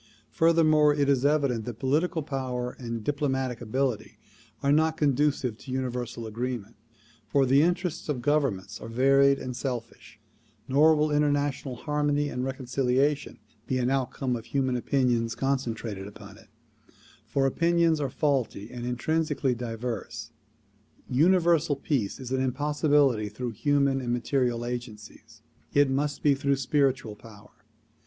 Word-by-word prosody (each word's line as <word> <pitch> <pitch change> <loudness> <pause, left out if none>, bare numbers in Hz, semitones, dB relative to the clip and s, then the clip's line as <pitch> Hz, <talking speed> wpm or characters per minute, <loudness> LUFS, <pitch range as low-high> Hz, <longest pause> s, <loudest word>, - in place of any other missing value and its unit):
Furthermore, 155 -3 +4
it 145 -1 +1
is 135 -2 +2
evident 140 -7 +1
that 120 -3 -6
political 155 +6 0
power 125 -3 -3
and 115 -3 -5
diplomatic 130 -3 -1
ability 120 -2 -2 0.5
are 140 - +3
not 160 +2 +3
conducive 140 -5 +1
to 130 - -9
universal 125 -2 -3
agreement, 115 -1 -4 0.5
for 135 +5 +3
the 135 +2 +4
interests 175 -1 -1
of 145 - 0
gov 145 +5 +2
ernments 100 -8 -4
are - - -7
varied 135 +3 +4
and 130 -2 -6
selfish; 120 -2 -6 0.5
nor 150 +4 +5
will 150 0 +1
international 145 -3 0
harmony 145 +1 0
and 125 -2 -3
reconciliation 135 +2 0 0.3
be 130 - 0
an 125 0 0
outcome 130 -1 -1
of 115 -1 -7
human 130 -1 0
opinions 120 -3 0
concentrated 115 -6 -2
upon 100 - -12
it, - - -18 0.8
for 135 -1 +1
opinions 170 +2 +2
are 140 - -1
faulty 130 -7 -1
and 120 -1 -6
intrinsically 150 +2 0
diverse. 115 -1 -5 0.8
Universal 165 +1 +3
Peace 135 -6 -2
is 130 -1 -7
an 130 0 +1
impossibility 140 -3 +2
through 120 +4 -5
human 140 +3 +1
and 120 -1 -3
material 120 -1 0
agencies; 120 -3 -8 0.3
it 140 -1 +4
must 145 +2 -1
be 145 - +5
through 140 0 +1
spiritual 135 -4 0
power. 105 -1 -15
135 Hz, 135 wpm, -27 LUFS, 120-145 Hz, 0.8 s, nor